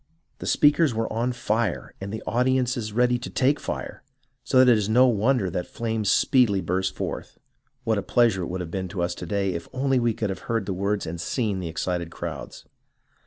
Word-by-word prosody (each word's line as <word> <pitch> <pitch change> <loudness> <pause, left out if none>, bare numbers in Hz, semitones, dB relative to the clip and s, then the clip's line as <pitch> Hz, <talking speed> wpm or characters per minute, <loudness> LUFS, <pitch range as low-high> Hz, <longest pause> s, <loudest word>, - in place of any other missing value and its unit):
The - - -6
speakers 145 -3 +4
were 110 0 -2
on 120 +3 0
fire, 115 -4 -1
and 100 +1 -5
the 110 - -5
audiences 125 -2 0
ready 125 +2 +2
to 125 - -6
take 140 +3 +2
fire, - - -5 0.4
so - - +1
that 130 0 +7
it - - +6
is 105 -1 -1
no 125 +4 +6
wonder 120 -2 +2
that 90 0 -3
flames 110 -3 -2
speedily 115 -6 +4
burst 95 +2 -1
forth. - - -5 0.5
What 110 -2 +1
a - - -2
pleasure 115 -3 +2
it 85 - -3
would 90 -2 -5
be 95 0 -3
to 90 -1 -3
us 85 0 -1
to 85 - -8
day 100 0 0
if 85 0 -5
only 135 0 +1
we 120 -2 +1
could 105 -3 -2
have 95 - -5
heard 115 -3 0
the 95 - -2
words 100 +2 -1
and 80 0 -5
seen 105 +1 -1
the 90 - -4
excited 85 +1 -2
crowds. - - -7
110 Hz, 210 wpm, -25 LUFS, 95-125 Hz, 0.5 s, that